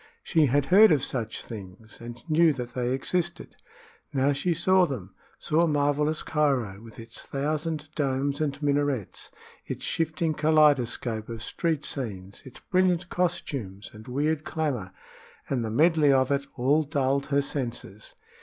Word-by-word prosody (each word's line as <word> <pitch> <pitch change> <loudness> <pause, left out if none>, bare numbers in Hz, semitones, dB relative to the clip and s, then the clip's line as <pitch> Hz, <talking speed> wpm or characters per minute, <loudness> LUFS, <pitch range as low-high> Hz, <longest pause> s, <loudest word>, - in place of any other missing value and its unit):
She 160 -4 +3
had 140 +2 +2
heard 215 +3 +8
of 145 -4 +3
such 115 -4 -3
things 110 +1 -10
and 120 0 -9
knew 160 0 +4
that 125 -2 -6
they 125 -1 -1
existed. 170 +6 -2 0.6
Now 135 +1 +2
she 155 +6 -1
saw 180 +2 +4
them 100 - -6 0.2
saw 165 +2 +2
marvelous 150 +1 +1
Cairo, 130 -10 0
with 115 -1 -13
its 115 0 -7
thousand 155 +2 -2
domes 140 0 -1
and 145 -2 -1
minarets, 145 -6 -1 0.3
its - - -6
shifting 160 0 -1
kaleidoscope 145 -8 +2
of 115 -1 -6
street 160 0 -2
scenes, 100 -10 -4
its 130 - -13
brilliant 180 -1 +1
costumes 135 - -2
and 110 0 -13
weird 150 +4 0
clamor 140 - -2 0.6
and 125 -4 -1
the 110 - -3
medley 155 +4 +4
of 130 0 +3
it 140 0 0
all 140 +5 +3
dulled 140 -2 0
her 140 -1 +2
senses. 120 -7 -5
140 Hz, 145 wpm, -27 LUFS, 120-155 Hz, 0.6 s, heard